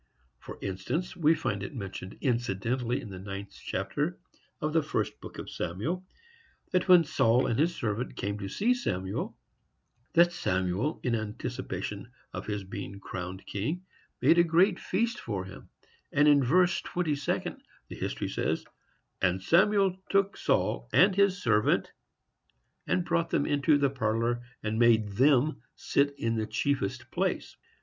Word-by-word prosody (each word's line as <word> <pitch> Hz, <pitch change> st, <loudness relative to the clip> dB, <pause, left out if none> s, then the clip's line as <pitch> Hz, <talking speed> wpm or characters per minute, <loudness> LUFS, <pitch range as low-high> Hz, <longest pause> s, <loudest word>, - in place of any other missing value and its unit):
For -, -, -9 dB
instance, 100 Hz, -, -3 dB
we 160 Hz, -1 st, +4 dB
find 100 Hz, -9 st, -2 dB
it 100 Hz, -, -6 dB
mentioned 100 Hz, -3 st, -6 dB
incidentally 120 Hz, 0 st, 0 dB
in 105 Hz, -, -9 dB
the 95 Hz, -, -7 dB
ninth 100 Hz, +1 st, -7 dB
chapter -, -, -2 dB, 0.4 s
of 155 Hz, 0 st, -2 dB
the 160 Hz, -, +4 dB
first 155 Hz, -, -2 dB
book -, -, -9 dB
of -, -, -6 dB
Samuel, 155 Hz, -, -3 dB, 0.7 s
that 185 Hz, -, +1 dB
when 180 Hz, -2 st, +8 dB
Saul 125 Hz, -4 st, +3 dB
and 115 Hz, -, 0 dB
his 170 Hz, +3 st, +2 dB
servant 115 Hz, +2 st, -2 dB
came 100 Hz, +1 st, -3 dB
to 100 Hz, -1 st, -5 dB
see 225 Hz, -, +2 dB
Samuel, 95 Hz, -, -3 dB, 0.8 s
that 175 Hz, +1 st, +5 dB
Samuel, 95 Hz, -, -1 dB
in 125 Hz, -, 0 dB
anticipation 110 Hz, -2 st, -4 dB, 0.2 s
of -, -, -6 dB
his 105 Hz, -2 st, -2 dB
being 100 Hz, +1 st, -7 dB
crowned 95 Hz, -1 st, -6 dB
king, 150 Hz, -, -3 dB, 0.4 s
made 170 Hz, -, +6 dB
a -, -, +7 dB
great 175 Hz, +3 st, +3 dB
feast 230 Hz, +5 st, -1 dB
for 100 Hz, -5 st, -4 dB
him; 95 Hz, +1 st, -12 dB, 0.4 s
and 145 Hz, +1 st, +4 dB
in 145 Hz, -2 st, +6 dB
verse 175 Hz, +7 st, +3 dB
twenty 175 Hz, -4 st, -1 dB
second 140 Hz, 0 st, -2 dB, 0.3 s
the -, -, -8 dB
history -, -, -3 dB
says: -, -, -1 dB, 0.6 s
"And 90 Hz, 0 st, +2 dB
Samuel 190 Hz, -, +3 dB
took 195 Hz, 0 st, +2 dB
Saul -, -, 0 dB
and 190 Hz, +1 st, +5 dB
his 200 Hz, -1 st, +3 dB
servant, 105 Hz, -2 st, +2 dB, 1.0 s
and 180 Hz, -, +1 dB
brought 170 Hz, -1 st, +1 dB
them 145 Hz, -, +1 dB
into 145 Hz, +1 st, +3 dB
the 140 Hz, -2 st, +2 dB
parlor, 115 Hz, -1 st, 0 dB, 0.2 s
and 110 Hz, +1 st, -1 dB
made 115 Hz, -3 st, +5 dB
them 135 Hz, +7 st, +3 dB
sit 140 Hz, 0 st, +1 dB
in 115 Hz, -2 st, -1 dB
the 110 Hz, -1 st, -1 dB
chiefest 140 Hz, -9 st, -1 dB
place." -, -, -1 dB
125 Hz, 155 wpm, -29 LUFS, 100-170 Hz, 1.0 s, when